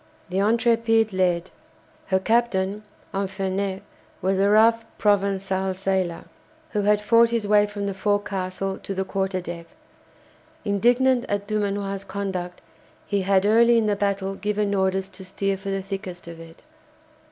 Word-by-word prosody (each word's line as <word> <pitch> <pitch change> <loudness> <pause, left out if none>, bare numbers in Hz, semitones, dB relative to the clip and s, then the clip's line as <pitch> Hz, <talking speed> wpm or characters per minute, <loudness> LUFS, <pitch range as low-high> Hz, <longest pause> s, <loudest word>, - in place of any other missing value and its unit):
The 185 - -3
"Intrépide" 225 0 +2
led. 180 -1 0 0.6
Her 190 - +2
captain, 205 -1 +1 0.3
Infernet, 195 0 -2 0.4
was 190 +1 0
a 200 +1 +3
rough 225 +2 +5
Provençal 195 -2 +1
sailor, 190 -3 -1 0.5
who 210 - 0
had 210 +1 +3
fought 230 +2 +5
his 230 -2 -1
way 210 0 +4
from 205 -1 -5
the 200 - -2
forecastle 195 -1 -2
to 195 - -6
the 190 0 -1
quarter 190 -1 -1
deck. 170 -1 -7 1.0
Indignant 245 +5 +3
at 205 0 -1
Dumanoir's 200 -2 -2
conduct, 185 -3 -4 0.4
he 200 -1 0
had 190 0 +2
early 235 +2 +5
in 225 - +2
the 210 -1 +1
battle 200 -1 -1
given 210 0 -1
orders 190 0 0
to 190 0 -11
steer 195 +1 -2
for 195 +1 -7
the 195 -1 -2
thickest 190 -3 -7
of 165 -1 -9
it. 165 0 -13
195 Hz, 145 wpm, -24 LUFS, 190-210 Hz, 1.0 s, rough